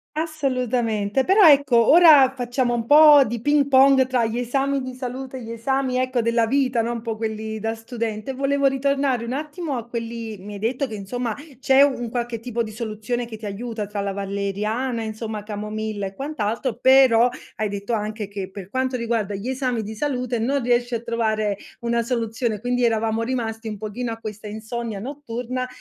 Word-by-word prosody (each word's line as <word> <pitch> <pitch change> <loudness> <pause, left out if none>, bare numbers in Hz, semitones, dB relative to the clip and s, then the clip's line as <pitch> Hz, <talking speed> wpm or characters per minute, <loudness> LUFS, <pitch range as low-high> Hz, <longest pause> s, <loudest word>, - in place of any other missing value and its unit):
Assolutamente, 255 -7 0
però 385 +2 +6
ecco 275 -6 +5
ora 300 -6 +8
facciamo 245 0 -1
un 235 -1 -1
po' 295 -1 +8
di 235 +1 -3
ping 290 +2 +3
pong 265 0 +6
tra 250 -3 +1
gli 225 +2 -2
esami 270 +3 0
di 255 0 -6
salute 255 +1 -6
e 245 - -8
gli 225 - -7
esami 255 +2 -1
ecco 255 -1 0
della 230 0 +2
vita, 255 -2 +1
no. 235 - -2
Un 235 -1 -4
po' 225 -1 -3
quelli 220 0 -4
da 225 +1 -2
studente, 225 +1 -4
volevo 275 +1 0
ritornare 270 -2 +1
un 235 - -5
attimo 300 0 -4
a 235 0 -6
quelli 230 -2 -5
Mi 205 +2 -9
hai 200 - -7
detto 255 +5 -1
che 220 - -7
insomma 225 +3 -3 0.2
c'è 270 0 +5
un 250 -5 0
qualche 240 -1 -3
tipo 235 0 -2
soluzione 220 +2 -4
che 220 -2 -8
ti 215 - -9
aiuta 215 +1 -4
tra 205 0 -4
la 200 0 -2
valeriana, 200 +5 -2
insomma, 220 -1 -5
camomilla 210 -1 -4
e 190 - -11
quant'altro, 235 -3 -3
però 255 -3 +6 0.3
hai 215 -1 -1
detto 200 +3 -4
anche 215 -1 -3
che 200 -1 -6
per 190 -1 -9
quanto 260 +2 -1
riguarda 225 -4 -1
gli 200 +5 -6
esami 255 -3 -1
di 215 +1 -7
salute 250 -2 -2
non 270 +5 0
riesci 240 0 +1
a 225 - -3
trovare 215 -3 0 0.3
una 235 0 0
soluzione, 230 -2 -2
quindi 245 +1 -1
eravamo 225 -1 +1
rimasti 230 -2 -3
un 210 - -5
pochino 220 +3 -4
a 225 - -5
questa 215 -1 -8
insonnia 220 0 -5
notturna, 255 -1 -5
235 Hz, 185 wpm, -23 LUFS, 220-260 Hz, 0.3 s, ora